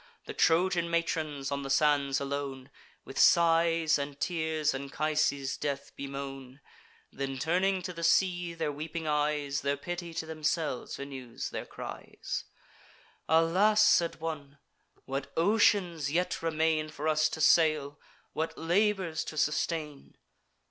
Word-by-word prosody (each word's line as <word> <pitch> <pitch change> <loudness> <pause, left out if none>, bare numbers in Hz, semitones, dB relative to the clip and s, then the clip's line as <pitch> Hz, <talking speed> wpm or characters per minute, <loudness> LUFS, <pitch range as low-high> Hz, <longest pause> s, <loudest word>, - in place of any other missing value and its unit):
The - - -6
Trojan 170 +1 +2
matrons, 155 -4 -1
on 140 0 -2
the 135 - -6
sands 140 -1 +2
alone, 140 -1 -4 0.3
With 135 - -6
sighs 165 -2 +4
and 140 0 -5
tears 160 -3 0
Anchises' 140 0 -1
death 140 -1 -3
bemoan; 135 -1 -7 0.5
Then, 135 0 -4
turning 185 +6 +1
to 180 - -5
the 170 0 -7
sea 175 -1 +2
their 160 -2 -1
weeping 155 +3 -5
eyes, 150 -1 0
Their 140 +1 0
pity 175 +2 -5
to 160 - -3
themselves 155 -4 -2
renews 135 -4 -6
their - - -5
cries. - - -6 0.8
"Alas!" 185 +7 +4
said 170 -1 +3
one, 145 -3 -5 0.5
"what 135 0 -4
oceans 175 -5 +2
yet 180 +3 0
remain 160 -1 +1
For 155 0 -5
us 155 0 +3
to - - -6
sail! 155 -3 +3 0.3
what 160 +1 -3
labours 180 -1 +1
to 155 - -7
sustain!" 150 -1 -2
155 Hz, 130 wpm, -30 LUFS, 140-170 Hz, 0.8 s, sighs